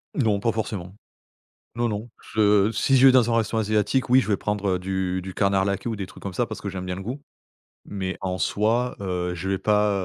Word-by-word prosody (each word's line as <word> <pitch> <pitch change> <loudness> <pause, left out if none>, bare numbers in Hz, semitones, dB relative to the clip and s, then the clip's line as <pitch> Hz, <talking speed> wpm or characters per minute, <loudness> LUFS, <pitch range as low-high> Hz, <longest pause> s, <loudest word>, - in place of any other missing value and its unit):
Non, 110 -8 +2
pas 115 +2 +1
forcément. 100 -4 -4 0.8
Non, 120 0 0
non. 105 +3 -4 0.2
Je 105 0 +4
si 135 +5 +2
je 130 - +6
vais 130 - +9
dans 120 -2 +4
un 115 - +3
restaurant 110 0 0
asiatique, 110 +5 +1
oui, 130 +1 +7
je 110 - -2
vais 100 -3 +1
prendre, 105 -1 -2
heu, - - -3
du 95 -1 -2
du 95 0 -7
canard 100 -1 +2
laqué 100 +3 -2
ou 115 - -2
des 100 -2 -5
trucs - - -14
comme 100 -2 -5
ça 120 +4 0
parce 110 - -6
que 100 - -5
j'aime 95 -1 -5
bien 90 0 -3
le 95 - -7
goût. 130 +7 -5 0.6
Mais, 95 -2 -4
en 95 -1 -2
soi, 115 +9 0
heu, 90 -2 -2
je 95 +3 -4
vais 95 - +1
pas, 105 0 +2
105 Hz, 240 wpm, -24 LUFS, 95-115 Hz, 0.8 s, vais